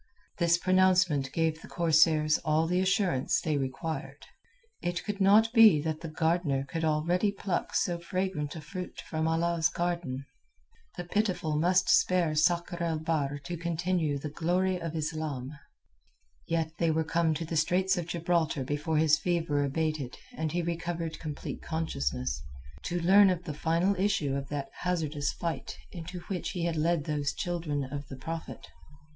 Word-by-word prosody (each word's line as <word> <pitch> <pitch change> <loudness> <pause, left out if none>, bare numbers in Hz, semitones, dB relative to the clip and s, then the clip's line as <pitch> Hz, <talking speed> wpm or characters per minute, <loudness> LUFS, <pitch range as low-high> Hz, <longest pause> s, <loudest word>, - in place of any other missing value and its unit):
This 170 -1 +4
pronouncement 185 -6 +3
gave 160 -1 0
the - - -11
corsairs 155 -2 +3
all 155 +1 +1
the 180 +2 +1
assurance 185 -7 +1
they 155 -2 -1
required. 140 +3 -4 0.6
It 175 -1 -2
could 205 -1 -4
not 215 +4 +5
be 220 -9 +8
that 155 -1 -3
the 165 - -5
Gardener 160 -3 0
could 165 +2 -3
already 170 +6 +2
pluck 195 -2 -3
so 175 -1 +1
fragrant 170 -4 -2
a 160 - -6
fruit 180 +3 -7
from 160 0 -1
Allah's 165 0 +2
garden. 170 -7 -2 0.7
The 175 - -3
Pitiful 180 -4 0
must 180 +4 +3
spare 175 -4 +3
Sakr 170 +2 +1
el 165 -2 0
Bahr 155 -3 -1
to 175 +6 -4
continue 170 -2 -1
the 145 +1 -6
glory 180 +3 0
of 165 -1 -4
Islam. 150 -4 -3 1.0
Yet 160 -1 -2
they 165 - +2
were 160 0 +1
come 160 0 +1
to 165 +2 -3
the 165 - -4
straits 185 +5 +2
of 175 -3 -3
Gibraltar 170 -4 0
before 150 +4 -1
his 155 0 +4
fever 165 -5 0
abated 150 -2 -2 0.2
and 160 -6 -2
he 175 +1 -1
recovered 170 -1 -3
complete 150 -3 -6
consciousness, 65 - -2 0.4
to 175 - -1
learn 195 +3 +6
of 180 -1 -1
the 155 - -5
final 165 +6 +1
issue 175 -9 +1
of 140 0 -4
that 140 -2 -4
hazardous 155 -5 -1
fight 170 -1 -4
into 175 +1 -7
which 180 0 -4
he 175 -3 -2
had 170 -1 -1
led 160 0 +1
those 145 -1 -1
children 165 -5 -2
of 140 +1 -6
the 135 - -8
Prophet. 165 +4 -6
165 Hz, 160 wpm, -29 LUFS, 150-175 Hz, 1.0 s, be